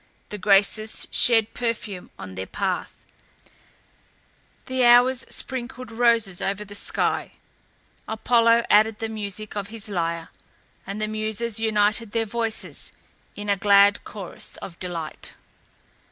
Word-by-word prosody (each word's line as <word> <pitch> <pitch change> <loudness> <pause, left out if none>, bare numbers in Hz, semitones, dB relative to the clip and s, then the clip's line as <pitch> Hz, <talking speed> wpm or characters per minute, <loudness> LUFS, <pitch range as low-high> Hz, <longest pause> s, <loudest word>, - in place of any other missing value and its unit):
The 210 - -6
Graces 205 +3 +2
shed 225 -3 +5
perfume 220 -6 -4
on 95 -1 -8
their 95 0 -6
path, - - -3 1.6
the 260 0 0
Hours 245 +1 +5
sprinkled 255 -1 -4
roses 230 -5 +2
over 200 +2 -2
the 205 - -11
sky, 205 - -1 0.7
Apollo 230 +1 +3
added 215 +1 +5
the 225 -1 -4
music 215 -1 -5
of 200 -1 -3
his 220 0 -8
lyre, 170 -4 -2 0.6
and 200 +2 -5
the 215 - -1
Muses 215 +1 -2
united 215 0 +1
their 225 -1 +1
voices 225 0 -3 0.4
in 205 0 -7
a 200 - +3
glad 200 +1 +5
chorus 195 -4 -8
of 170 -3 -10
delight. 170 -4 -6
215 Hz, 125 wpm, -24 LUFS, 200-230 Hz, 1.6 s, shed